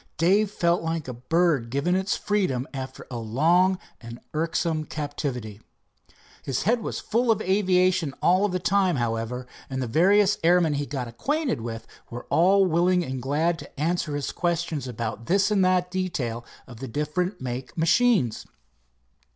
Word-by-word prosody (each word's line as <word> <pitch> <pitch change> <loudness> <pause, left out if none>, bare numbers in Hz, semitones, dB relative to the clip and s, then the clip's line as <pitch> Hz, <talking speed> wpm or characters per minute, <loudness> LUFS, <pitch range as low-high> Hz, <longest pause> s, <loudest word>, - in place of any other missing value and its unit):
Dave 195 +5 +3
felt 170 -3 +1
like 165 -2 -3
a 125 - -4
bird 135 0 +1
given 140 +8 0
its 190 +1 0
freedom 180 -11 -1
after 130 -1 -7
a 120 - -4
long 165 - +2 0.2
and 115 0 -9
irksome 160 0 -1
captivity. 135 -9 -5 0.8
His 135 -2 -2
head 235 +3 +2
was - - -4
full 235 +2 0
of 220 - +3
aviation 185 -5 +2
all 185 +3 +3
of 205 - +1
the 185 - 0
time, 185 0 +2
however, 120 +1 -2 0.2
and 130 -1 -3
the 130 - -1
various 195 - +3
airmen 170 -2 +4
he 145 0 -2
got 130 -4 -4
acquainted 275 - -2
with 115 -1 -6 0.2
were 120 +1 -7
all 190 +4 +5
willing 180 +1 +2
and 130 -2 -4
glad 160 +6 0
to - - -12
answer 165 -1 -1
his 145 - -3
questions 170 -5 -2
about 115 -1 -5
this 195 +3 +2
and 200 -2 +3
that 180 -1 +1
detail 150 -11 -2 0.2
of 120 -4 -12
the 135 - -6
different 150 - -2
make 130 +2 -6
machines. 165 - +2
165 Hz, 160 wpm, -25 LUFS, 130-185 Hz, 0.8 s, all